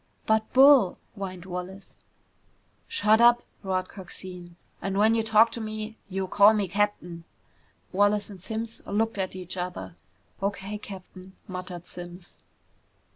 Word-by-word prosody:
"But, 220 0 +1
Bull 265 -7 +7
!" - - -40
whined 185 -3 -6
Wallace. 185 +2 -7 0.9
"Shut 220 - +3
up!" 240 0 +6 0.2
roared 185 -2 -1
Coxine. 180 -2 -10 0.3
"And 195 0 -2
when 215 +2 +5
you 230 - +2
talk 220 +1 +5
to 230 - -5
me, 215 0 -5
you 190 0 -2
call 205 +3 +6
me 205 -2 0
captain!" 180 -3 -1 0.7
Wallace 205 +2 +2
and 190 -3 -11
Simms 225 +2 -5
looked 220 +1 0
at 185 -1 -2
each 185 0 -6
other. 180 -1 -5 0.5
"O.K., 200 +1 -3
Captain," 190 -2 -10
muttered 180 -2 -7
Simms. 175 +1 -9
195 Hz, 135 wpm, -27 LUFS, 185-220 Hz, 0.9 s, Bull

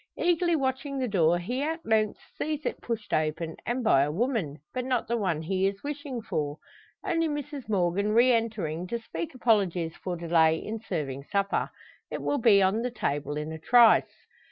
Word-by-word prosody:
Eagerly 345 0 +2
watching 275 0 -2
the 260 -1 0
door, 175 -5 +3
he 240 +10 -3
at 325 +2 -3
length 215 -1 +1 0.2
sees 305 -1 -3
it - - -3
pushed 225 -3 -4
open; 155 +1 -1
and 245 +1 -1
by 140 -12 +5
a 140 - +1
woman, 200 - -1 0.2
but 255 - -2
not 250 -2 -1
the 235 - 0
one 180 -8 -1
he 190 +3 +1
is 195 0 -4
wishing 285 -4 -5
for. 150 -7 -2 0.5
Only 330 -4 +1
Mrs 290 -4 -5
Morgan 200 +1 +1
re 240 +4 +5
entering 200 -8 -1
to 235 - -2
speak 170 -4 -6
apologies 190 -9 +1
for 180 -1 -4
delay 165 -1 +3
in 220 +6 -5
serving 140 -10 -4
supper. 200 +2 0 0.4
It - - -5
will 285 - 0
be 210 -4 +6
on 195 +4 +2
the 250 - -1
table 145 - -2
in 150 +1 -4
a 160 - -6
trice. 235 +7 +4
215 Hz, 185 wpm, -28 LUFS, 165-255 Hz, 0.5 s, be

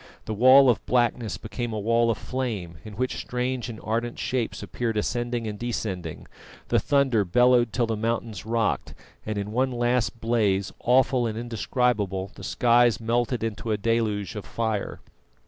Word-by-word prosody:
The 110 - -3
wall 130 +5 +7
of 120 -4 +2
blackness 120 -2 +1
became 120 +2 -5
a 110 - -2
wall 115 +2 +2
of 115 - +1
flame, 105 -11 -4
in 105 -2 -9
which 130 +3 -2
strange 125 0 -2
and 110 -2 -7
ardent 115 +2 -2
shapes 125 -3 -2
appeared 115 -3 -3
ascending 120 +2 -1
and 105 -1 -5
descending; 95 -9 -4 0.4
the - - +3
thunder 135 -7 +2
bellowed 120 +4 +4
till 120 +2 +1
the 115 -1 -2
mountains 110 -3 -2
rocked, 115 0 -1 0.3
and 110 -1 -2
in 100 +1 -3
one 130 +4 +1
last 120 -1 0
blaze, 105 -4 +1
awful 125 -1 +3
and 110 -1 -4
indescribable, 115 -4 -1
the - - -12
skies 120 -1 +3
melted 120 +1 0
into 110 0 -3
a 105 - +1
deluge 105 -3 0
of 105 - -5
fire. 110 -3 -3
115 Hz, 165 wpm, -25 LUFS, 105-120 Hz, 0.4 s, wall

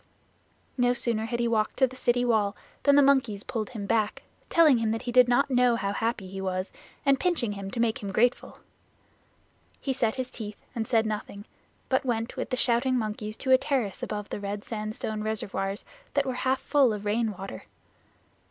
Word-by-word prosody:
No 245 0 +3
sooner 230 -2 0
had 235 +1 -3
he 240 - +1
walked 220 -2 0
to 265 - +5
the 260 0 -7
city 245 -1 +1
wall 215 -4 +2 0.3
than 285 -1 +5
the 285 - +7
monkeys 250 -7 +2
pulled 220 -3 -3
him 220 -5 -6
back, 215 0 0 0.3
telling 310 -7 +5
him 225 -1 0
that 225 +1 -2
he 245 - -3
did 250 0 +6
not 255 +3 +2
know 250 -1 +4
how 200 -3 -2
happy 225 -2 -2
he 195 +1 -6
was, 185 0 -3 0.3
and 275 -1 +4
pinching 340 - 0
him 200 -1 -6
to 230 - -5
make 235 +2 +1
him 200 -2 -4
grateful. 240 +5 +1 1.2
He 270 - -1
set 230 -4 0
his 255 -1 -4
teeth 210 -3 -7
and 225 -2 -3
said 225 -2 +3
nothing, 210 -1 -5 0.4
but 260 - +1
went 230 -2 -2
with - - -4
the 255 - -1
shouting 250 +2 +2
monkeys 215 -1 -4
to 260 - -1
a 260 - +7
terrace 255 -11 -1
above 210 -1 -4
the - - -4
red 205 0 -4
sandstone 215 -1 -4
reservoirs 200 -2 -3 0.3
that 285 -1 +3
were 260 - -1
half 260 +1 0
full 280 -6 +3
of 210 0 -6
rain 220 +1 +1
water. 195 +1 -8
230 Hz, 200 wpm, -27 LUFS, 210-255 Hz, 1.2 s, the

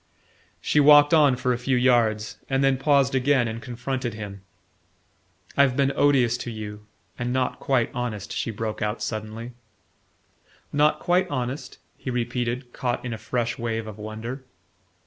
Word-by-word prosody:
She 150 - +1
walked 145 +1 +7
on 145 -5 +5
for 125 0 0
a 120 - -3
few 125 +1 +1
yards, 115 -4 +2
and 135 0 +1
then 135 -1 +3
paused 140 -1 +3
again 130 -1 +2
and 115 +1 -5
confronted 125 0 -4
him. 100 -2 -7 1.1
"I've 140 -2 +3
been 140 0 +2
odious 130 -5 +3
to 120 - -5
you 105 -2 -7 0.3
and 120 0 -2
not 130 0 -1
quite 130 -4 +1
honest," 110 -6 -4
she - - -2
broke 110 0 -4
out 105 +1 -2
suddenly. 110 +2 -5 1.2
"Not 150 +1 +3
quite 180 +1 +1
honest?" 130 0 -4 0.2
he - - -5
repeated, 120 0 -2
caught 125 0 -2
in 120 - -3
a 110 - -6
fresh 120 -1 -2
wave 115 -1 -2
of 110 -1 -9
wonder. 110 +5 -6
125 Hz, 155 wpm, -25 LUFS, 115-135 Hz, 1.2 s, walked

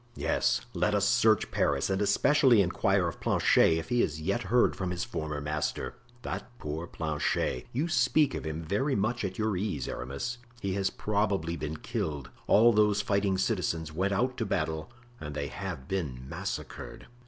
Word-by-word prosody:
"Yes, - - +1
let - - +1
us - - +2
search - - +3
Paris 70 -1 +1
and 95 +1 0
especially 130 +3 +4
inquire 90 - +1
of - - -5
Planchet 80 - +4
if 80 0 -5
he 120 -1 +3
has 75 0 -1
yet 100 +9 -1
heard 115 +5 +3
from 95 -2 -3
his 90 -1 -2
former 75 -10 -4
master." 75 +1 -2 0.3
"That - - -5
poor 80 0 -5
Planchet! 75 -6 -1
You 145 +8 0
speak 155 -3 +3
of - - -4
him 80 +1 -4
very 105 - 0
much 110 +3 0
at 95 -1 -3
your 110 -2 0
ease, 90 - -2
Aramis; 70 - -4 0.2
he 100 -4 -2
has 95 0 +1
probably 100 -6 -1
been 75 -1 -4
killed. 70 -5 -4 0.2
All 115 +3 +6
those 105 -1 +3
fighting 100 -2 +1
citizens 80 -4 -1
went 95 +5 0
out 125 +6 0
to 115 - -1
battle 80 +4 -2 0.3
and 75 -1 -6
they 70 -1 -3
have 90 -8 -6
been 70 -10 -3
massacred." - - -6
95 Hz, 175 wpm, -29 LUFS, 75-105 Hz, 0.3 s, All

